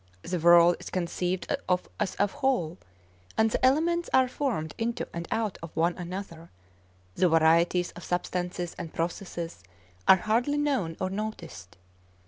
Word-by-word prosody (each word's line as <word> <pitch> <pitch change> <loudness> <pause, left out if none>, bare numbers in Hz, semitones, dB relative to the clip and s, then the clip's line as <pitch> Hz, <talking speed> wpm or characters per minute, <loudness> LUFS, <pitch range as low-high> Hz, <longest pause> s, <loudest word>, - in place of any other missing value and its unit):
The 180 0 -2
world 170 +1 +6
is - - -8
conceived 180 0 -1
of 180 0 +1
as 210 -3 -1
a 205 - +4
whole, 205 - -1 0.6
and 220 0 +3
the - - -1
elements 330 +6 +2
are 260 -1 +5
formed 240 - -2
into 230 +1 -2
and 170 0 -5
out 220 -4 -1
of 165 - -7
one 170 +2 +2
another; 175 -2 -7 0.6
the 180 - +3
varieties 165 +2 +3
of 175 - -11
substances 180 0 -2
and 165 - -6
processes 170 - -4 0.5
are 190 - +9
hardly 235 +9 +1
known 265 - 0
or 185 0 -2
noticed. 195 - -6
180 Hz, 145 wpm, -28 LUFS, 170-220 Hz, 0.6 s, are